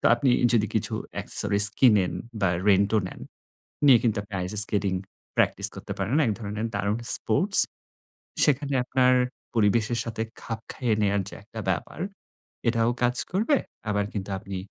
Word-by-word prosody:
তো -, -, -18 dB
আপনি 125 Hz, +2 st, 0 dB, 0.2 s
যদি 110 Hz, -3 st, +2 dB
কিছু -, -, -1 dB, 0.3 s
accessories 100 Hz, 0 st, +5 dB
কিনেন 105 Hz, -9 st, +4 dB, 0.3 s
বা 95 Hz, -, +2 dB, 0.2 s
রেন্ট 100 Hz, 0 st, +3 dB
ও -, -, +4 dB
নেন -, -, -12 dB, 0.7 s
নিয়ে 130 Hz, -4 st, +7 dB
কিন্তু 115 Hz, -3 st, 0 dB
আপনি 105 Hz, 0 st, -12 dB
আইস 90 Hz, +2 st, -3 dB
স্কেটিং 100 Hz, -2 st, -2 dB, 0.4 s
প্র্যাকটিস -, -, +3 dB
করতে -, -, -7 dB
পারেন। 100 Hz, +6 st, -2 dB
এক 110 Hz, -, +1 dB
ধরনের 105 Hz, 0 st, -4 dB
দারুণ 100 Hz, +2 st, -1 dB, 0.2 s
স্পোর্টস। -, -, +1 dB, 0.9 s
সেখানে 140 Hz, -1 st, 0 dB
আপনার 130 Hz, 0 st, +2 dB, 0.4 s
পরিবেশের 115 Hz, +1 st, +1 dB
সাথে 110 Hz, -1 st, -4 dB, 0.2 s
খাপ 115 Hz, -1 st, -6 dB
খাইয়ে 120 Hz, -4 st, -1 dB
নেওয়ার 100 Hz, -1 st, +1 dB
যে -, -, -9 dB
একটা 110 Hz, +2 st, -9 dB
ব্যাপার 95 Hz, -, -4 dB, 0.7 s
এটাও 115 Hz, 0 st, +1 dB
কাজ 125 Hz, 0 st, +1 dB, 0.2 s
করবে। 225 Hz, +10 st, +1 dB, 0.3 s
আবার 105 Hz, 0 st, 0 dB
কিন্তু 100 Hz, -1 st, -5 dB
আপনি 95 Hz, 0 st, -8 dB
110 Hz, 155 wpm, -25 LUFS, 100-120 Hz, 0.9 s, নিয়ে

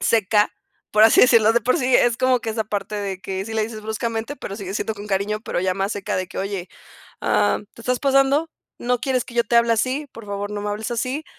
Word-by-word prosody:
seca, 210 Hz, -1 st, +3 dB, 0.4 s
por 215 Hz, +1 st, +4 dB
así 225 Hz, -, +7 dB
decirlo, 230 Hz, -3 st, +6 dB
de 235 Hz, -, +3 dB
por 255 Hz, -, +2 dB
sí, 255 Hz, -1 st, +1 dB
es 240 Hz, -1 st, +2 dB
como 255 Hz, -1 st, +3 dB
que 230 Hz, -, -3 dB
esa 220 Hz, 0 st, -2 dB
parte 210 Hz, 0 st, -4 dB
de 195 Hz, -2 st, -3 dB
que 190 Hz, +1 st, -4 dB
sí 220 Hz, -, -6 dB
le 220 Hz, -, +1 dB
dices 215 Hz, 0 st, -5 dB
bruscamente, 225 Hz, +4 st, -3 dB
pero 200 Hz, -, -7 dB
sigue 195 Hz, -2 st, -6 dB
siendo 220 Hz, -, -1 dB
con 205 Hz, 0 st, -9 dB
cariño, 205 Hz, +2 st, -1 dB
pero 215 Hz, -, -3 dB
ya 185 Hz, 0 st, +1 dB
más 195 Hz, +2 st, -1 dB
seca 200 Hz, -2 st, -3 dB
de 185 Hz, -, -2 dB
que: -, -, -12 dB
"Oye, 195 Hz, -3 st, -3 dB, 0.5 s
ah, 105 Hz, 0 st, +2 dB, 0.2 s
te -, -, -13 dB
estás 250 Hz, +1 st, 0 dB
pasando, 275 Hz, +3 st, +3 dB, 0.3 s
¿no 245 Hz, 0 st, 0 dB
quieres 255 Hz, -2 st, 0 dB
que -, -, -12 dB
yo 235 Hz, -, +3 dB
te 235 Hz, +1 st, +1 dB
hable 235 Hz, 0 st, +4 dB
así? 260 Hz, +6 st, 0 dB
Por 225 Hz, -2 st, -11 dB
favor, 200 Hz, 0 st, -4 dB
no 205 Hz, 0 st, -4 dB
me 205 Hz, -, -3 dB
hables 215 Hz, +3 st, -4 dB
así". 255 Hz, +6 st, -2 dB
220 Hz, 250 wpm, -22 LUFS, 205-245 Hz, 0.5 s, así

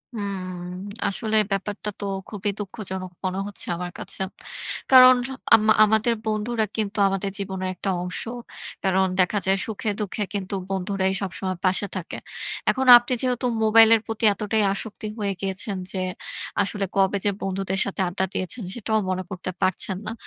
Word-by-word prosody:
হুম, 200 Hz, -3 st, -3 dB, 0.6 s
আসলে 220 Hz, +2 st, -1 dB, 0.2 s
ব্যাপারটা 205 Hz, +2 st, -2 dB
তো 205 Hz, -, -4 dB, 0.2 s
খুবই 205 Hz, -1 st, -3 dB
দুঃখজনক 190 Hz, -2 st, -5 dB
মনে 185 Hz, +1 st, -1 dB
হচ্ছে 205 Hz, -, -3 dB
আমার 175 Hz, 0 st, -5 dB
কাছে। -, -, -5 dB, 0.7 s
কারণ 255 Hz, -1 st, +10 dB, 0.4 s
আম 215 Hz, -1 st, +2 dB, 0.2 s
আমাদের 220 Hz, +2 st, +3 dB
বন্ধুরা 220 Hz, +1 st, 0 dB
কিন্তু 215 Hz, -1 st, -2 dB
আমাদের 195 Hz, 0 st, -1 dB
জীবনের 190 Hz, -1 st, -3 dB
একটা 195 Hz, -, -3 dB
অংশ। 180 Hz, 0 st, -2 dB, 0.6 s
কারণ 190 Hz, 0 st, +3 dB
দেখা 185 Hz, +3 st, +3 dB
যায় 190 Hz, +1 st, +3 dB
সুখে-দুঃখে 210 Hz, -1 st, -2 dB
কিন্তু 200 Hz, -1 st, -3 dB, 0.2 s
বন্ধুরাই 190 Hz, 0 st, 0 dB
সবসময় 185 Hz, -1 st, -3 dB
পাশে 190 Hz, +2 st, +1 dB
থাকে। 185 Hz, -3 st, -5 dB, 0.5 s
এখন 265 Hz, 0 st, -1 dB
আপনি 240 Hz, +1 st, -1 dB
যেহেতু 250 Hz, -1 st, 0 dB, 0.2 s
মোবাইলের 225 Hz, 0 st, +7 dB
প্রতি 225 Hz, 0 st, -1 dB
এতটাই 210 Hz, +1 st, 0 dB
আসক্তি 215 Hz, +1 st, -6 dB
হয়ে 200 Hz, -1 st, 0 dB
গিয়েছেন 195 Hz, +1 st, -3 dB
যে, 190 Hz, -, -2 dB, 0.6 s
আসলে 200 Hz, 0 st, -1 dB
কবে 195 Hz, +1 st, +3 dB
যে 205 Hz, -, +4 dB
বন্ধুদের 195 Hz, 0 st, -1 dB
সাথে 200 Hz, 0 st, -3 dB
আড্ডা 180 Hz, +2 st, -1 dB
দিয়েছেন 195 Hz, +6 st, -3 dB
সেটাও 220 Hz, -1 st, 0 dB
মনে 185 Hz, 0 st, -1 dB
করতে 185 Hz, -1 st, -5 dB
পারছেন 185 Hz, +1 st, 0 dB
না। -, -, -2 dB
200 Hz, 150 wpm, -24 LUFS, 190-215 Hz, 0.7 s, কারণ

